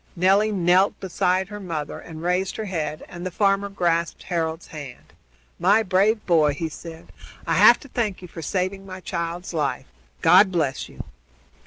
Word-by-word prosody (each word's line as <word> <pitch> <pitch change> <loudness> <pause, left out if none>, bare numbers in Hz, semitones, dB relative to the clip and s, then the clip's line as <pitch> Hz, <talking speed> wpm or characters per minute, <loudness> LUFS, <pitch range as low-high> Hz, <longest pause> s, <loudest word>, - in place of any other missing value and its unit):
Nelly 195 +4 +3
knelt 185 +1 +3
beside 185 +1 0
her 210 0 -7
mother 165 -6 -5
and 160 0 -10
raised 180 +2 0
her 220 - -4
head, 155 -5 -4
and 175 0 -9
the 185 - -2
farmer 195 +2 +1
grasped 170 -3 -1
Harold's 165 -2 -2
hand. 145 -5 -10 0.5
"My 200 +6 +4
brave 205 +3 +2
boy," 155 -5 +3
he 160 +2 -3
said, 165 +1 -11 0.3
"I - - 0
have - - +7
to 280 - -12
thank 215 -8 -2
you - - -8
for 165 - -9
saving 190 +4 -2
my 190 -1 -9
child's 175 0 -4
life. 155 -3 -1 0.4
God 185 +4 +6
bless 150 -7 -1
you!" - - -9
180 Hz, 170 wpm, -23 LUFS, 165-195 Hz, 0.5 s, have